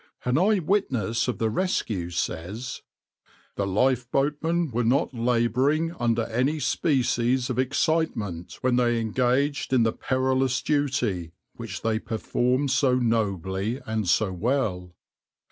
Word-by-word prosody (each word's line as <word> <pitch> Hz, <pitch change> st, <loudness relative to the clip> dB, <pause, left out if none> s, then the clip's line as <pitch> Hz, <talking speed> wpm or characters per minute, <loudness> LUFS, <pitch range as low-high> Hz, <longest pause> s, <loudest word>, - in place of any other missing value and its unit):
\par 125 Hz, -, -1 dB
An 130 Hz, -, +3 dB
eye 210 Hz, +4 st, +4 dB
witness 135 Hz, -, 0 dB
of 125 Hz, -5 st, -1 dB
the 110 Hz, +1 st, 0 dB
rescue 110 Hz, -, -1 dB
says: 95 Hz, +8 st, -4 dB, 0.7 s
"The 100 Hz, -, -1 dB
lifeboatmen 135 Hz, -, +1 dB
were 120 Hz, +1 st, 0 dB
not 130 Hz, +4 st, +1 dB
labouring 125 Hz, +7 st, +1 dB
under 120 Hz, -8 st, 0 dB
any 125 Hz, +8 st, 0 dB
species 130 Hz, -4 st, +1 dB
of -, -, -2 dB
excitement 130 Hz, -, -1 dB
when 125 Hz, -1 st, +2 dB
they 120 Hz, -1 st, +2 dB
engaged 130 Hz, +5 st, 0 dB
in 125 Hz, -3 st, +4 dB
the 115 Hz, -, +1 dB
perilous 130 Hz, 0 st, 0 dB
duty, 125 Hz, -, -1 dB, 0.2 s
which 110 Hz, -7 st, -7 dB
they 110 Hz, -1 st, +1 dB
performed 125 Hz, +5 st, 0 dB
so 130 Hz, -1 st, +3 dB
nobly 105 Hz, -2 st, -1 dB
and 110 Hz, -4 st, -2 dB
so 100 Hz, 0 st, +2 dB
well. 90 Hz, -5 st, -1 dB
125 Hz, 130 wpm, -25 LUFS, 110-135 Hz, 0.7 s, eye